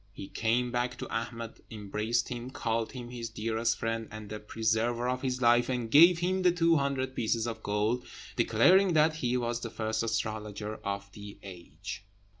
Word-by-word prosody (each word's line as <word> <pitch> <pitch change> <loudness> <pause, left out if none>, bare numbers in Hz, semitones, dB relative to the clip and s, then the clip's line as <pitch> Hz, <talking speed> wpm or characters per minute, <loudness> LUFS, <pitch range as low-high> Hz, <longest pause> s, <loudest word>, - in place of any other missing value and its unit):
He 95 - -8
came 120 +2 0
back 120 0 -1
to - - -5
Ahmed, 115 0 -5
embraced 110 +3 -1
him, 120 0 -5
called 115 -3 -2
him 120 -2 -7
his 120 -2 -5
dearest 115 +1 -1
friend 115 0 -2
and 110 -1 -9
the 105 - -4
preserver 115 +3 0
of 125 0 -1
his 130 -1 -2
life, 120 +1 +5
and 120 -3 -2
gave 170 +4 +8
him 185 +2 0
the 180 -1 +5
two 165 -1 +3
hundred 135 -2 -1
pieces 115 0 0
of 115 -1 -4
gold, 105 +4 0 0.3
declaring 190 0 +4
that 155 0 +4
he 125 -4 0
was 120 -1 -1
the 115 - -4
first 110 0 -2
astrologer 110 -1 -3
of 100 0 -5
the 100 0 -10
age. 95 0 -8
115 Hz, 180 wpm, -30 LUFS, 110-125 Hz, 0.3 s, gave